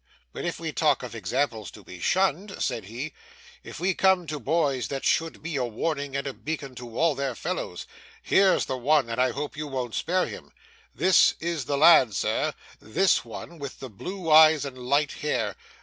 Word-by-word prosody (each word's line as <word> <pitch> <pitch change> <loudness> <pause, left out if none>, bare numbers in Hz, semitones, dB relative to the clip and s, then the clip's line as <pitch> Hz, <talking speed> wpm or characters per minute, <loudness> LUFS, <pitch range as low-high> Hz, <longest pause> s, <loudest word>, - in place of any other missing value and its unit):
'But - - -5
if 175 - -3
we 165 -1 -4
talk 150 -4 +1
of 125 - -7
examples 110 0 -2
to - - -14
be 90 - -11
shunned,' 190 - 0
said 110 - -2
he, 120 +9 -6 0.5
'if - - -9
we 185 +1 +1
come 190 -1 +3
to 150 -1 -5
boys 140 -1 0
that 135 -1 -4
should 165 -2 0
be 160 -3 -3
a 130 - 0
warning 140 +4 -3
and 140 - -2
a 135 - -3
beacon 145 -3 -5
to 120 -2 -9
all 165 -1 +3
their 135 -2 -3
fellows, - - -4 0.4
here's 195 -1 +3
the 130 - -3
one, 135 -2 +2
and 115 +2 0
I 130 - +3
hope 145 -2 -5
you 150 +1 -5
won't 130 -4 -4
spare 180 +2 0
him. - - -10 0.4
This 185 -1 +5
is 165 -5 -3
the 140 +2 -1
lad, 140 -8 +6
sir; - - 0 0.2
this 185 - +2
one 170 -1 -9
with 140 -2 -7
the 130 -3 -8
blue 180 - -5
eyes 155 -1 +7
and 135 -2 -6
light 140 +4 0
hair. 110 -9 -2
145 Hz, 195 wpm, -26 LUFS, 125-165 Hz, 0.5 s, eyes